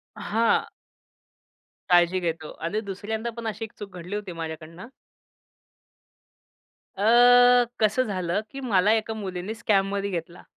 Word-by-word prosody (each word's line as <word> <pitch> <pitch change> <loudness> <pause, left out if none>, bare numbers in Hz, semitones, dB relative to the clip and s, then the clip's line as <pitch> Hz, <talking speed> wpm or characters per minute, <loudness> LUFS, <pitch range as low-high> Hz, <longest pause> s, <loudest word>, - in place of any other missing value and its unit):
हां. 225 +2 +1 1.2
काळजी 175 +1 +4
घेतो 165 -3 -4
आणि 205 +6 -1
दुसऱ्यांदा 220 +3 -4
पण 230 -1 -5
अशी 220 +1 -4
एक 215 - -14
चूक 200 -3 -9
घडली 180 +4 -6
होती 205 -3 -5
माझ्याकडनं. 165 +3 -8 2.1
अ, 245 +3 +6 0.2
कसं 220 +4 +3
झालं 185 0 -1
की 275 - -7
मला 210 -4 +2
एका 220 0 -1
मुलीने 190 -1 -5
स्कॅममध्ये 200 -2 0
घेतला. 175 -1 -6
200 Hz, 120 wpm, -25 LUFS, 180-220 Hz, 2.1 s, अ